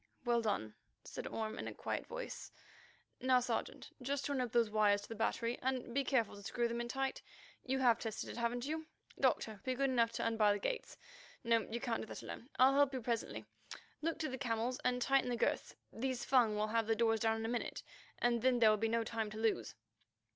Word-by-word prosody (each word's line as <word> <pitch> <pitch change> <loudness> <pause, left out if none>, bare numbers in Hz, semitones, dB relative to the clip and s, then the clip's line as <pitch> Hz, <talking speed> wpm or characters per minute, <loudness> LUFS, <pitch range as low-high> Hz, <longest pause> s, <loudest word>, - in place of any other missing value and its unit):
"Well 240 -1 +3
done," 200 - -1 0.3
said - - -6
Orme 220 0 -3
in - - -4
a - - -6
quiet - - -3
voice. - - -6 0.7
"Now, 255 0 +4
Sergeant, 250 - -3
just 275 +2 -1
join 280 -3 0
up 245 -3 -2
those 230 -2 +3
wires 205 -1 +3
to - - -10
the - - -4
battery, 230 +2 -1
and 255 -2 -1
be 275 +2 +2
careful 245 -7 +1
to 200 - -10
screw 235 +4 0
them 235 0 -2
in 240 - -3
tight. 270 +2 -2 0.5
You 265 +1 +1
have 245 -3 +4
tested 225 -2 -4
it, - - -6
haven't 240 +1 -1
you? 315 +2 -3 0.3
Doctor, 215 -3 +1
be 255 -1 -1
good 275 +1 +1
enough 230 -2 +3
to - - -2
unbar 220 -2 +4
the - - -1
gates. 475 - -3 0.5
No, 230 -1 +2
you 235 - -2
can't 235 -2 -1
do - - -6
that - - -7
alone; 245 - -8
I'll 260 +1 +7
help 285 0 +4
you 255 - -2
presently. 220 - -2 0.6
Look 330 +1 -1
to 320 -1 -1
the 260 0 -5
camels 240 0 -1
and 250 0 +2
tighten 270 -2 +3
the 245 - 0
girths. - - 0 0.2
These 255 +1 -2
Fung 240 -5 +4
will 210 +1 0
have 225 0 +1
the 225 - +3
doors 225 -1 +3
down 225 -1 +2
in 225 - -3
a - - 0
minute, 240 +1 -3 0.3
and 240 -1 +2
then 255 0 +4
there 225 -2 +6
will 215 - +3
be 225 +2 +1
no 230 0 +1
time 225 -1 -2
to 215 - -8
lose." 220 - 0
235 Hz, 225 wpm, -36 LUFS, 225-260 Hz, 0.7 s, I'll